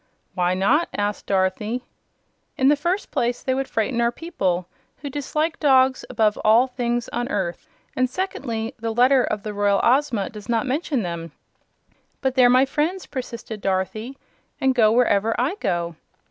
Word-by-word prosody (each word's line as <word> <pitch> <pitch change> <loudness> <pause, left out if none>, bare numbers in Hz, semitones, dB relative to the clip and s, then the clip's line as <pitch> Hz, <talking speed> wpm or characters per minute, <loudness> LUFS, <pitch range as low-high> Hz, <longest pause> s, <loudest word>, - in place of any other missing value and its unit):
"Why 180 0 +1
not?" 255 - +2
asked 205 0 -2
Dorothy. 200 +5 0 0.7
"In 265 +1 +4
the 295 - +5
first 345 +7 -2
place 240 +1 -1
they 260 - 0
would 270 +1 -2
frighten 235 +2 -1
our 235 0 +2
people, 185 - -2 0.4
who 285 - -4
dislike 305 +3 -2
dogs 265 -3 +4
above 215 -2 +1
all 225 +4 +5
things 240 -2 -2
on 240 0 -2
earth; 185 -8 -3 0.3
and, 255 0 +1
secondly, 255 -8 -3
the 225 0 -3
letter 255 +2 +5
of 210 -2 -2
the 215 - -4
Royal 205 -1 +2
Ozma 245 -6 +2
does 210 0 -11
not 230 +2 +1
mention 275 -2 -1
them." 170 -2 -5 0.9
"But 265 -1 0
they're 255 -2 +5
my 255 +2 +5
friends," 315 +7 -1
persisted 235 -5 -6
Dorothy, 205 +7 -2 0.4
"and 265 0 +2
go 220 -4 +4
wherever 225 -2 +2
I 260 +8 +1
go." 170 -1 -1
240 Hz, 160 wpm, -23 LUFS, 205-265 Hz, 0.9 s, the